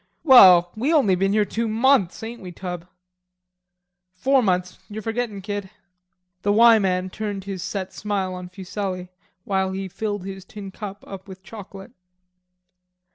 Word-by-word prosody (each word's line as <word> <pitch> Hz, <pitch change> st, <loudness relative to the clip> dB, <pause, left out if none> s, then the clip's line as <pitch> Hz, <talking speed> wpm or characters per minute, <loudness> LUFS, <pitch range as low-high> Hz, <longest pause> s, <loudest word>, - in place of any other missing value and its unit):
"Well, 185 Hz, -, +8 dB
we 255 Hz, +8 st, 0 dB
only 275 Hz, -, +4 dB
been 195 Hz, +2 st, +1 dB
here 210 Hz, -1 st, +3 dB
two 230 Hz, +3 st, -2 dB
months, 225 Hz, -3 st, +2 dB
ain't 235 Hz, +2 st, -7 dB
we, 180 Hz, -2 st, -8 dB
Tub?" 175 Hz, -1 st, -7 dB, 1.3 s
"Four 265 Hz, +7 st, +3 dB
months; 180 Hz, -4 st, -1 dB
you're 215 Hz, +1 st, -7 dB
forgettin', 225 Hz, -3 st, -3 dB
kid." 205 Hz, -1 st, -4 dB, 0.7 s
The 205 Hz, -, +1 dB
"Y" 225 Hz, +1 st, +6 dB
man 185 Hz, -1 st, -1 dB
turned 205 Hz, -2 st, -4 dB
his 195 Hz, -2 st, -6 dB
set 190 Hz, 0 st, -4 dB
smile 200 Hz, -3 st, -2 dB
on 180 Hz, 0 st, -7 dB
Fuselli 185 Hz, -1 st, -5 dB, 0.3 s
while 190 Hz, -1 st, -1 dB
he 195 Hz, 0 st, -4 dB
filled 205 Hz, 0 st, -4 dB
his 195 Hz, -1 st, -7 dB
tin 200 Hz, -1 st, -9 dB
cup 200 Hz, 0 st, -8 dB
up 195 Hz, 0 st, -10 dB
with 190 Hz, -1 st, -11 dB
chocolate. 195 Hz, -2 st, -11 dB
195 Hz, 150 wpm, -23 LUFS, 185-215 Hz, 1.3 s, Well